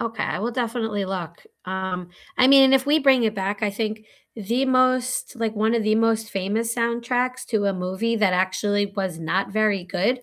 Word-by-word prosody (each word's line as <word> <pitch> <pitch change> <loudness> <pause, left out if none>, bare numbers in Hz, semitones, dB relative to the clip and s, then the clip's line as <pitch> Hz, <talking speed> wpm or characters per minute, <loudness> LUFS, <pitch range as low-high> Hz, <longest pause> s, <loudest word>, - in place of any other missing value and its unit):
Okay, 225 -1 -3
I - - -2
will 230 +3 -2
definitely 225 -4 -2
look. 175 -3 -6 0.2
Um, 185 -1 -4 0.3
I 255 - +6
mean, 275 0 +7
and 265 0 +6
if 265 +1 +2
we 300 +2 +4
bring 270 -4 +4
it 215 0 0
back, 200 +2 -3
I 205 - +1
think 215 +1 -4 0.3
the 235 +5 -1
most, 255 0 +1
like, 225 -1 -2
one 220 +2 +1
of 230 - +1
the 215 0 +2
most 225 0 +1
famous 215 +4 -2
soundtracks 245 +2 -1
to 210 -3 0
a 200 - +2
movie 190 +6 -2
that 205 -4 +2
actually 205 +2 0
was 185 -4 -3
not 185 +5 -1
very 210 -4 +1
good 200 +8 -1
220 Hz, 200 wpm, -23 LUFS, 195-240 Hz, 0.3 s, mean